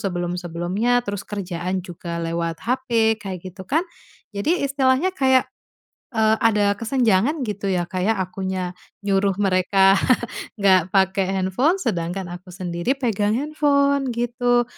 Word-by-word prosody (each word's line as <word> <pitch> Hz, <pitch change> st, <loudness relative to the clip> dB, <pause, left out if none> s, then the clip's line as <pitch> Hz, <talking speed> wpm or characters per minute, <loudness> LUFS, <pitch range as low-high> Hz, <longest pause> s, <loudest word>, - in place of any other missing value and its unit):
sebelum 175 Hz, -2 st, -2 dB
sebelumnya, 180 Hz, +8 st, 0 dB
terus 200 Hz, -2 st, -4 dB
kerjaan 185 Hz, -2 st, -3 dB
juga 170 Hz, -1 st, -6 dB
lewat 165 Hz, 0 st, -2 dB
HP, 230 Hz, -3 st, +1 dB
kayak 190 Hz, -2 st, -5 dB
gitu 190 Hz, +1 st, -10 dB
kan. 320 Hz, +5 st, +1 dB, 0.5 s
Jadi 310 Hz, -, 0 dB
istilahnya 275 Hz, +5 st, +2 dB
kayak, 260 Hz, -4 st, +3 dB, 0.7 s
eee, 220 Hz, 0 st, +3 dB
ada 210 Hz, -3 st, +3 dB
kesenjangan 240 Hz, +3 st, +1 dB
gitu 205 Hz, -1 st, -3 dB
ya 180 Hz, -2 st, +1 dB
Kak 185 Hz, -, -3 dB
ya, 220 Hz, -, +3 dB
akunya 185 Hz, -1 st, -3 dB, 0.3 s
nyuruh 195 Hz, -1 st, +2 dB
mereka 195 Hz, 0 st, +4 dB, 0.6 s
nggak 185 Hz, -3 st, +3 dB
pake 195 Hz, 0 st, +3 dB
handphone 190 Hz, -, +1 dB
sedangkan 180 Hz, -, -2 dB
aku 180 Hz, +2 st, -9 dB
sendiri 175 Hz, +7 st, -2 dB
pegang 215 Hz, -5 st, 0 dB
handphone, 280 Hz, -1 st, +1 dB
gitu. 240 Hz, +1 st, +1 dB
200 Hz, 130 wpm, -22 LUFS, 185-245 Hz, 0.7 s, mereka